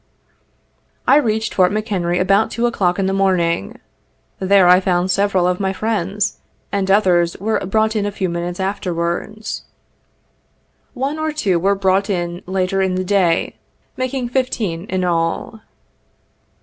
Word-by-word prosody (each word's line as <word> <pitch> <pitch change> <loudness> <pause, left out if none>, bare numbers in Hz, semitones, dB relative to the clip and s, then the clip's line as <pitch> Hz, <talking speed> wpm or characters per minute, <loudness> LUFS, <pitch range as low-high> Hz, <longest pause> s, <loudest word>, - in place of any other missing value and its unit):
I 275 - +6
reached 220 -5 0
Fort 185 -1 +3
McHenry 195 -5 -1
about 195 +4 +3
2 235 +1 -1
o'clock 185 -7 +1
in 195 - 0
the 190 - 0
morning. 180 - 0 0.6
There 190 -1 +4
I 180 +1 +7
found 185 -1 0
several 190 -1 +2
of 180 0 0
my 190 -1 -1
friends, 210 -1 -2 0.3
and 195 -1 -1
others 180 -4 +3
were 220 +3 -1
brought 220 +2 +1
in 205 -1 0
a - - -2
few 195 -1 -2
minutes 175 +1 -4
afterwards. 190 +2 -3 1.3
One 275 +4 -2
or 315 0 -1
two 200 - 0
were 195 +3 +2
brought 195 +1 +1
in 175 -2 -2
later 190 +1 0
in 190 -1 0
the 185 0 -2
day, 180 -4 +1 0.4
making 255 -1 -2
fifteen 220 -9 -2
in 185 -2 -2
all. 170 +5 -1
195 Hz, 145 wpm, -19 LUFS, 180-215 Hz, 1.3 s, I